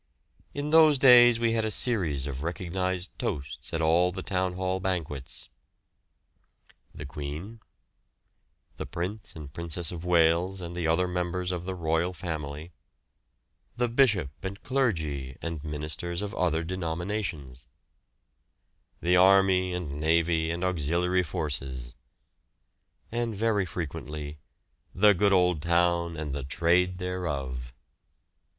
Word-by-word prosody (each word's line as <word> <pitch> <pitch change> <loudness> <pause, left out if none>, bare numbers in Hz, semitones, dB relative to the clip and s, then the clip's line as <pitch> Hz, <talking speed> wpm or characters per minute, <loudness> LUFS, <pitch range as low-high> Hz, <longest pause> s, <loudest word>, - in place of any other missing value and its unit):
In 145 +1 -3
those 155 -2 +7
days 120 -3 +7
we 115 -1 +2
had 115 -1 +1
a 110 - 0
series 90 - 0
of 70 -2 -5
recognised 90 +2 -2
toasts 70 -2 -4
at 80 - -1
all 85 +3 +3
the 95 +1 -6
Town 95 -1 -1
Hall 95 +1 -1
banquets: 80 -8 -4 1.4
"The 75 - -8
Queen," 75 +10 -7 1.2
"The - - -5
Prince 95 +5 -5
and 75 -3 -9
Princess 85 0 -2
of 85 -2 -7
Wales, 90 +2 +3
and 85 -1 -6
the 85 -2 -1
other 85 +3 +2
Members 90 0 -2
of 90 -1 -4
the 95 0 -3
Royal 85 +1 0
Family," 80 -1 -5 1.1
"The 120 0 +2
Bishop 115 - +2
and 100 +1 -6
Clergy, 80 - -1
and 85 -3 -5
Ministers 75 +4 -3
of 105 +1 -5
other 85 -4 0
denominations," 85 - -4 1.3
"The 90 +1 +3
Army 95 0 +5
and 80 -5 -4
Navy 80 +1 +2
and 85 +2 -3
Auxiliary 90 +1 +1
Forces," 70 -7 -3 1.2
and 120 -1 -2
very 105 -2 +1
frequently 75 -3 -6 0.6
"The 105 +2 +6
good 100 +2 +2
old 90 -4 +3
town 85 0 +1
and 75 -3 -4
the 70 -1 -4
trade 90 +6 +2
thereof." 70 -10 -4
85 Hz, 125 wpm, -28 LUFS, 80-95 Hz, 1.4 s, those